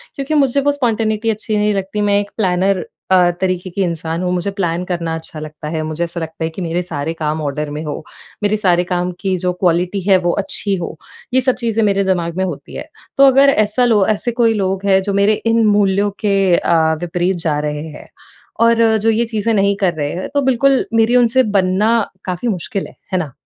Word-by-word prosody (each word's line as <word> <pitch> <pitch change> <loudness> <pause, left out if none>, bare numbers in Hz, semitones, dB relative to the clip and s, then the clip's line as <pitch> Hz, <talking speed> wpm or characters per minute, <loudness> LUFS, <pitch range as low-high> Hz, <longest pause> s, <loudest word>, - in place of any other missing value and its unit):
क्योंकि 275 +2 -3
मुझे 280 -2 +3
वो 285 - +2
स्पॉन्टेनिटी 225 -5 0
अच्छी 215 0 -1
नहीं 210 0 +1
लगती, 195 +1 -3
मैं 205 -1 +2
एक 205 0 -5
प्लानर 190 -1 +1 0.3
अ, 180 -1 +5
तरीके 185 -1 -1
की 195 +3 -3
इंसान 165 -1 -3
हूँ। 180 - -1
मुझे 180 +2 -1
प्लान 175 -2 -1
करना 170 -2 -2
अच्छा 160 -1 -7
लगता 155 0 -8
है। 160 0 -2
मुझे 155 +2 -2
ऐसा 170 0 -4
लगता 160 0 -6
है 160 - -1
कि 175 +4 -8
मेरे 170 +1 -1
सारे 160 -2 -4
काम 155 -1 -3
ऑर्डर 150 +1 -3
में 150 +1 -5
हो। 150 0 -5 0.4
मेरे 205 +1 +2
सारे 180 -4 +2
काम 180 0 0
की 190 -1 -1
जो 180 +1 -1
क्वालिटी 180 +2 0
है 195 -2 +6
वो 175 - +3
अच्छी 200 +1 -2
हो, 175 -3 -5 0.4
ये 260 - +4
सब 255 0 +1
चीज़ें 230 -2 -1
मेरे 200 -1 +2
दिमाग 175 -2 -1
में 190 - +1
होती 185 - -6
है। - - -6 0.3
तो 275 - +6
अगर 275 +1 +6
ऐसा 215 +1 +2
लो 215 -5 +3
ऐसे 235 +3 -3
कोई 230 -1 +2
लोग 195 -2 -2
है, 190 -1 +4
जो 200 +1 -2
मेरे 200 +2 +3
इन 230 +1 +1
मूल्यों 205 -1 +2
के 195 -4 +2
अ, 160 -1 +2
विपरीत 175 +2 -1
जा 150 -2 +1
रहे 150 0 -4
हैं - - -14 0.6
और 230 -1 +4
जो 220 +1 +1
ये 225 +1 +2
चीज़ें 225 0 -1
नहीं 200 -1 +2
कर 180 -3 +2
रहे 145 -2 -3
हैं, 180 - -5
तो 285 - +2
बिल्कुल 265 0 +2
मेरी 225 +2 +3
उनसे 250 +1 +4
बनना 190 +4 +2 0.3
काफ़ी 185 +5 -3
मुश्किल 195 -1 -3
है। - - -17 0.2
है 185 - +3
ना? 155 -6 -4
195 Hz, 220 wpm, -17 LUFS, 175-220 Hz, 0.6 s, है